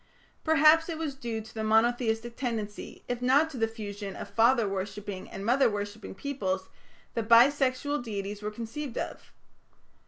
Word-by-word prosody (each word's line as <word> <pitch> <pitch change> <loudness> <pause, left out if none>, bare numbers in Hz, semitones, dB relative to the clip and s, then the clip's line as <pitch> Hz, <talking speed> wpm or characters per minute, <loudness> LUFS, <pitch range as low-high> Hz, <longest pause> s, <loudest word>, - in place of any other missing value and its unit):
Perhaps 320 +1 +5
it 325 - -3
was 315 -3 -3
due 235 -4 -4
to 220 - -13
the 220 - -3
monotheistic 230 +1 +2
tendency, 220 -5 -4
if 245 0 -3
not 280 +6 +4
to 270 - -7
the 225 -1 +2
fusion 205 -3 -6
of - - -8
father 230 -1 +4
worshipping 195 0 -5
and 195 - -7
mother 255 +2 +4
worshipping 205 0 -5
peoples, 190 -9 -3 0.4
that 230 -2 -3
bi 235 +4 +8
sexual 285 +1 0
deities 205 -3 -5
were 210 - -2
conceived 235 +5 -6
of. - - -5
230 Hz, 160 wpm, -29 LUFS, 210-265 Hz, 0.4 s, bi